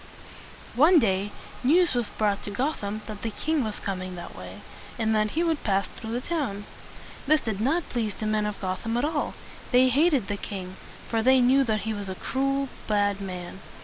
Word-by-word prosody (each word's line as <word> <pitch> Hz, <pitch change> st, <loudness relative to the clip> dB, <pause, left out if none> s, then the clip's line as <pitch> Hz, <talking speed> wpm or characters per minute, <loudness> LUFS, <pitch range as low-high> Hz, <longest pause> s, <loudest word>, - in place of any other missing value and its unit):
One 315 Hz, +8 st, +7 dB
day, 200 Hz, -5 st, +2 dB, 0.3 s
news 340 Hz, +6 st, +4 dB
was 240 Hz, -3 st, 0 dB
brought 205 Hz, -2 st, 0 dB
to -, -, -4 dB
Gotham 215 Hz, -3 st, -2 dB
that 215 Hz, -2 st, -7 dB
the 225 Hz, -, -2 dB
king 305 Hz, +6 st, 0 dB
was 215 Hz, -2 st, -3 dB
coming 185 Hz, -2 st, -4 dB
that 175 Hz, -1 st, -8 dB
way, -, -, -9 dB, 0.4 s
and 220 Hz, -1 st, +1 dB
that 215 Hz, 0 st, +2 dB
he 335 Hz, -, +3 dB
would 325 Hz, -3 st, 0 dB
pass 195 Hz, -1 st, +1 dB
through 220 Hz, -, -9 dB
the 245 Hz, -, -1 dB
town. 255 Hz, -11 st, -2 dB, 0.6 s
This 310 Hz, +1 st, +4 dB
did 215 Hz, -3 st, -3 dB
not 310 Hz, +8 st, +1 dB
please 225 Hz, -4 st, -1 dB
the 215 Hz, -, -5 dB
men 215 Hz, 0 st, +1 dB
of 210 Hz, -, -5 dB
Gotham 195 Hz, +5 st, -2 dB
at 245 Hz, -, +1 dB
all. 305 Hz, -1 st, -1 dB, 0.4 s
They 255 Hz, 0 st, +6 dB
hated 280 Hz, -, +3 dB
the 205 Hz, -, -2 dB
king, 190 Hz, -2 st, -6 dB, 0.3 s
for 225 Hz, -1 st, 0 dB
they 260 Hz, +3 st, +5 dB
knew 260 Hz, +2 st, +5 dB
that 215 Hz, -3 st, 0 dB
he 220 Hz, 0 st, -2 dB
was 205 Hz, -2 st, -5 dB
a 190 Hz, -, -4 dB
cruel, 275 Hz, +5 st, 0 dB, 0.2 s
bad 205 Hz, -1 st, +1 dB
man. 180 Hz, -1 st, -6 dB
220 Hz, 200 wpm, -26 LUFS, 205-270 Hz, 0.6 s, One